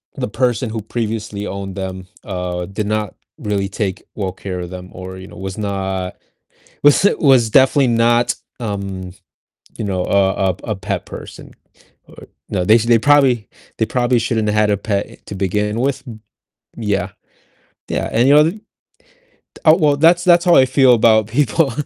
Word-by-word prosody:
the - - -3
person 120 +1 0
who 110 -1 -4
previously 110 -2 -4
owned 100 -1 -6
them, 95 -1 -6 0.2
uh, 90 -2 -4
did 100 +1 -4
not 105 -2 -2 0.2
really 100 -2 -2
take 95 -1 -4
well 95 -3 -3
care 90 -1 -6
of 85 - -7
them, 90 0 -9
or, 95 0 -8
you 95 +1 -10
know, - - -14
was 95 +1 -6
not 95 -3 -3 0.7
was 145 +6 +5
was 130 -6 +4
definitely 135 +3 +4
not, 120 +1 +2 0.3
um, 100 -4 -5 0.7
you 110 - -3
know, 95 -2 -2
a 95 -1 +2
a - - -2
p - - -22
a - - -2
pet 95 - -4
person, - - -10 0.5
or, - - -18 0.3
you - - -4
know, - - 0
they 110 - +5
s 115 - +1
they 115 -1 +4
probably 135 -5 +3 0.3
they 110 - +1
probably 120 +1 +1
shouldn't 110 -2 -1
have 105 - 0
had 105 -1 +3
a 100 - +2
pet 100 0 -2
e - - -14
to 100 - -7
begin 105 +4 -1
with 135 0 -1
m 110 -3 -10 0.6
Yeah. 100 -5 -2 0.8
Yeah, - - -2
and, 120 +4 +2
you 140 - +6
know, 150 - +7
the 190 +7 -2 1.0
Oh, 155 0 +7
well, 150 -5 +2
that's 170 +3 +4
that's 175 -1 +5
how 175 - +5
I 130 - +6
feel 130 -1 +5
about 110 -2 +4
people 140 +3 +1
110 Hz, 185 wpm, -18 LUFS, 95-125 Hz, 1.0 s, know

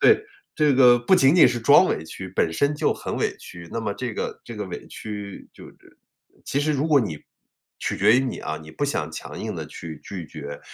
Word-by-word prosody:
对， 425 - +5 0.3
这 150 -2 +3
个 125 -2 +6
不 120 +10 +3
仅 135 -2 +5
仅 175 - +8
是 120 -2 -1
装 - - +7
委 - - -1
屈， 95 - -8
本 85 -3 +1
身 145 - +1
就 - - +1
很 - - -5
委 - - -1
屈。 85 -1 -11
那 115 - -3
么 105 -2 -2
这 110 +2 -5
个 - - -4
这 115 - -9
个 105 - -3
委 90 - -8
屈 105 -2 -8
就 - - -13
是 - - -16 0.7
其 140 - -1
实 155 +1 +1
如 145 +3 0
果 150 -3 +6
你 85 -10 -3 0.6
取 - - -2
决 110 - +5
于 130 - +4
你 130 -2 -3
啊， 75 0 -4
你 80 0 -12
不 145 - -2
想 80 - -2
强 80 - -8
硬 - - -4
地 - - -5
去 80 -3 -9
拒 90 -5 -7
绝， 70 -2 -8
115 Hz, 250 characters per minute, -24 LUFS, 85-135 Hz, 0.7 s, 仅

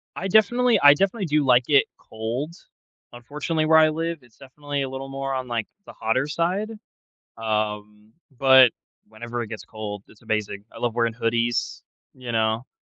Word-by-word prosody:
I 190 - -3
definitely 230 +5 +3
I 145 0 +9
definitely 195 +6 -1
do 150 -2 +1
like 125 -1 +4
it 140 -2 +5
cold. 115 +8 -5 0.6
Unfortunately, 150 +6 -3
where 160 +1 +5
I 155 0 +6
live, 165 +1 -3
it's 120 -3 -23
definitely 140 +1 -6
a 135 - -2
little 135 +1 -6
more 135 0 -4
on, 130 -1 -3
like, 115 -3 -2 0.2
the - - -12
hotter 130 +5 -1
side. 180 +7 -1 0.7
Um, 105 -1 -3 0.2
but, 130 -1 +7 0.4
whenever 120 +2 -6
it 115 - -5
gets 110 0 -8
cold, 105 -2 -7
it's 110 - -20
amazing. 110 -3 -3
I - - -13
love 120 -2 -2
wearing 115 -1 0
hoodies, 120 0 -1 0.3
you 125 -2 -7
know? 110 +2 0
130 Hz, 170 wpm, -23 LUFS, 110-150 Hz, 0.7 s, I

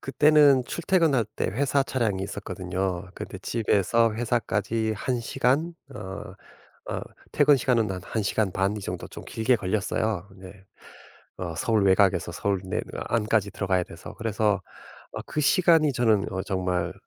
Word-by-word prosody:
그때는 145 -1 +5
출퇴근할 165 -8 +1
때 - - 0
회사 135 +7 +1
차량이 115 -8 -1
있었거든요. 95 -1 -4
근데 - - -7
집에서 115 0 +1
회사까지 110 -1 -1
1시간 130 - 0 0.2
어 95 -3 -7 0.5
어 - - -2 0.3
퇴근 145 - +5
시간은 115 -4 +1
한 95 -1 -4
1시간 105 -2 -1
반 95 +3 0
이 - - -5
정도 95 - -5
좀 - - -10
길게 115 +3 +1
걸렸어요. 100 -1 -1
근데 95 0 -14 0.7
어 85 -3 -4
서울 110 +5 +1
외곽에서 95 -2 +3
서울 100 +2 -1
내 95 +3 -2 0.3
안까지 110 -2 +1
들어가야 95 -3 0
돼서. 85 - -11
그래서 105 -3 0 0.5
어 - - -5
그 150 - -2
시간이 160 -1 +4
저는 110 -5 +1
어 95 -1 -2
정말 90 -2 -1
105 Hz, 295 characters per minute, -26 LUFS, 95-120 Hz, 0.7 s, 그때는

